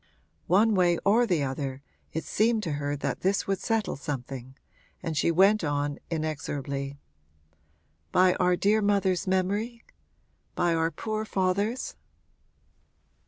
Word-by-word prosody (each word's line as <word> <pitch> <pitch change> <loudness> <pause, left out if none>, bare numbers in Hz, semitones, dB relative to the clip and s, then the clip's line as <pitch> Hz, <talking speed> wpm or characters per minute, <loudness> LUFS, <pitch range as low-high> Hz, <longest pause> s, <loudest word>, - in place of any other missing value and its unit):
One 210 +6 +4
way 175 -3 +3
or 230 +4 +4
the 170 -8 +1
other 135 0 -4 0.3
it 160 - -3
seemed 220 0 +1
to 165 - -2
her 145 0 -2
that 140 - -3
this 195 +1 +1
would 195 -1 -1
settle 225 -2 -1
something, 130 -2 -6 0.5
and 165 - -3
she 150 - +2
went 195 +4 +4
on 145 -1 -1
inexorably 145 -3 -3 1.1
'By 185 0 +5
our 180 0 +3
dear 210 +4 +2
mother's 195 -3 +1
memory 205 +5 -1 0.7
by 175 -1 +2
our 165 0 +1
poor 215 +6 -3
father's?' 205 - -1
180 Hz, 125 wpm, -27 LUFS, 145-205 Hz, 1.1 s, By